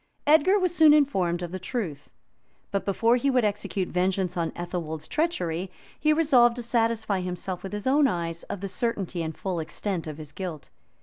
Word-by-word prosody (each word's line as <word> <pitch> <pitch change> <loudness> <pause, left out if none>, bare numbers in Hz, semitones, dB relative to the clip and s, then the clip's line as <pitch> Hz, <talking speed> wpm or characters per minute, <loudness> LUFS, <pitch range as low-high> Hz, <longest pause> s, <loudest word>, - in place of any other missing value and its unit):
Edgar 315 +7 +5
was 365 -3 +1
soon 315 -3 +7
informed 185 - +1
of 175 - -5
the 185 - -4
truth; 185 - -5 0.6
but 200 - -1
before 230 +4 +3
he 275 +3 +1
would 250 -4 +3
execute 200 -2 -2
vengeance 180 0 0
on 170 -2 0
Athelwold's 165 -3 -4
treachery, 185 - -1 0.3
he 305 - +3
resolved 265 -7 +4
to 245 - -5
satisfy 225 -4 0
himself, 180 0 -4
with 195 - -7
his 210 0 -5
own 280 +2 +4
eyes, 170 -5 -3
of 200 - -4
the 200 - -3
certainty 195 -4 -2
and 160 -1 -4
full 185 -3 -2
extent 165 +2 -3
of 155 -1 -6
his 155 -2 -9
guilt. 170 -3 -7
195 Hz, 185 wpm, -26 LUFS, 175-245 Hz, 0.6 s, soon